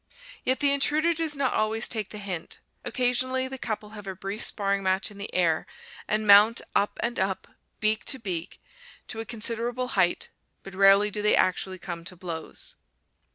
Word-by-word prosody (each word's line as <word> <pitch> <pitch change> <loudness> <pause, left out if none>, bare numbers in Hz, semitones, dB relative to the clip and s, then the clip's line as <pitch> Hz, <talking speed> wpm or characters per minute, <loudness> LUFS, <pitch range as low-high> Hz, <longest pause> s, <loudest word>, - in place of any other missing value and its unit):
Yet 260 +2 +1
the 285 -1 +4
intruder 305 +4 +2
does 320 -2 -1
not 275 -2 0
always 220 +2 +2
take 215 -4 -1
the 210 - -8
hint. 190 -5 -5 0.2
Occasionally 255 +1 0
the 265 0 -7
couple 215 -3 -4
have 210 -2 -10
a 190 - -4
brief 195 +3 -5
sparring 200 -1 +1
match 190 +2 +1
in 200 - -13
the 200 - -5
air, 165 -3 +1 0.4
and 215 0 0
mount 210 +3 +7 0.2
up 205 - +1
and 235 +1 -1
up, 190 0 -1 0.3
beak 215 +1 +2
to 270 - +2
beak, 185 -7 -5 0.5
to 220 - -4
a 225 - -4
considerable 235 +2 -2
height, 185 -6 +1 0.3
but 195 - -10
rarely 195 +2 +5
do 210 - -2
they 210 - +4
actually 185 0 +1
come 175 -2 -7
to 180 - -6
blows. 170 -3 -6
210 Hz, 180 wpm, -26 LUFS, 190-240 Hz, 0.5 s, mount